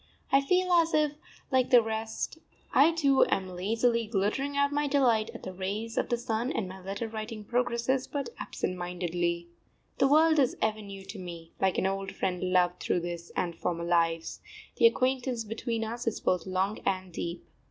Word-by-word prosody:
I 275 - +6
feel 365 +5 +2
as 335 -2 +4
if, 305 -1 +3 0.4
like 260 -1 +3
the 245 -3 +7
rest, 220 +7 -3 0.3
I 300 +4 +6
too 280 -5 +4
am 185 -1 -1
lazily 230 +5 +1
glittering 225 +7 -1
out 280 0 +3
my 290 0 +1
delight 245 -6 +3
at - - -9
the 185 - -6
rays 205 +5 -4
of - - 0
the 240 - +1
sun, 235 +1 -1
and 200 - -2
my 190 +1 -9
letter 195 +5 -4
writing 220 -1 -6
progresses 245 +2 0
but 280 -4 -3
absent 185 - -3
mindedly. 175 -1 -2 0.5
The 270 - +5
world 310 +2 +5
is 260 -3 +2
ever 215 0 0
new 195 -2 -9
to 195 +1 -8
me; 170 -2 -8
like 190 -1 +2
an - - +1
old 195 0 -2
friend 180 -1 -2
loved 180 -1 +3
through 175 - 0
this 170 0 -6
and 170 -2 -1
former 170 0 -2
lives, 165 -1 0 0.4
the 465 - +8
acquaintance 255 - 0
between 225 +1 -3
us 235 +2 -5
is 230 - 0
both 180 -1 0
long 190 +3 0
and 185 -1 -1
deep. 170 +1 -5
220 Hz, 185 wpm, -29 LUFS, 185-255 Hz, 0.5 s, the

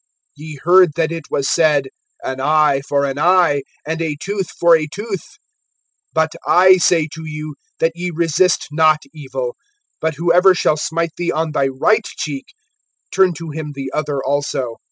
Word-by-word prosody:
(38)Ye 155 -1 -8
heard 180 -1 +5
that 165 -1 0
it 165 -3 -5
was 135 - -1
said: 145 -4 +2 0.3
An 130 0 -4
eye 150 -1 +3
for 140 0 +1
an 140 0 -3
eye, 175 -4 +3 0.2
and 160 +2 -3
a 160 -2 -2
tooth 195 0 -3
for 170 -1 +4
a 155 -1 -1
tooth. 205 - -7 0.8
(39)But 160 0 +2 0.2
I 185 +1 +6
say 165 -2 +2
to 160 - -8
you, 150 0 -6 0.2
that 165 - +1
ye 175 +1 -4
resist 170 +1 +1
not 155 0 +3
evil; 130 -5 -5 0.4
but 160 -1 -1
whoever 175 +4 +4
shall 155 -3 +1
smite 165 +1 -2
thee 175 - -1
on 160 0 -2
thy 140 -2 +1
right 205 +12 +1
cheek, 140 -3 -4 0.7
turn 190 -2 +3
to 165 0 -7
him 150 -1 -6
the 135 -1 -5
other 145 -2 -2
also. 135 -4 -2
160 Hz, 170 wpm, -18 LUFS, 145-170 Hz, 0.8 s, I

